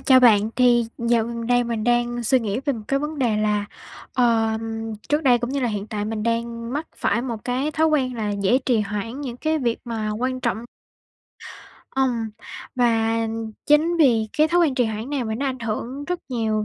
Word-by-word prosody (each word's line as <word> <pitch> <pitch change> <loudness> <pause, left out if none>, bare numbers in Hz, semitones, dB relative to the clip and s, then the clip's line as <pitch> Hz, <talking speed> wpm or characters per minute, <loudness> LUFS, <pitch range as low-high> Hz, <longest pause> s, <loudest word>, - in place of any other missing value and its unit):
chào 260 -2 +6
bạn, 220 -3 +5
thì 240 -2 +4
dạo 235 -1 +2
gần 235 0 -5
đây 245 0 +3
mình 230 -2 -2
đang 240 0 +1
suy 255 +3 +3
nghĩ 215 +2 -2
về 285 - +1
một 225 -4 -6
cái 275 - +2
vấn 300 +1 -4
đề 235 -5 +2
là, 210 -1 +1 0.5
ờm, 225 -2 0
trước 295 +1 +2
đây 250 -3 +5
cũng 240 +1 -3
như 280 +1 -1
là 245 - +1
hiện 205 -1 -3
tại 210 -1 -3
mình 215 0 -3
đang 230 +1 -2
mắc 300 +3 -2
phải 235 - 0
một 235 -4 -5
cái 255 +4 -1
thói 315 +1 +2
quen 270 -5 +1
là 215 -3 -2
dễ 200 +4 +2
trì 250 -4 +1
hoãn 210 +5 -4
những 255 -4 -5
cái 315 +4 0
việc 235 -5 0
mà 225 -3 -3
quan 255 +4 -2
trọng. 235 -2 -1 1.3
Ùm, 245 -4 0 0.4
và 230 -2 +2 0.5
chính 310 +4 +4
vì 235 -8 +4
cái 310 +1 +5
thói 350 +2 +3
quen 310 -6 +3
trì 250 -2 +2
hoãn 220 +3 -4
này 280 -4 -1
mà 220 -1 -2
nó 275 +5 -2
ảnh 260 -1 -2
hưởng 235 +5 -4
rất 360 +2 -2
nhiều 220 -4 0
235 Hz, 210 wpm, -23 LUFS, 225-260 Hz, 1.3 s, chào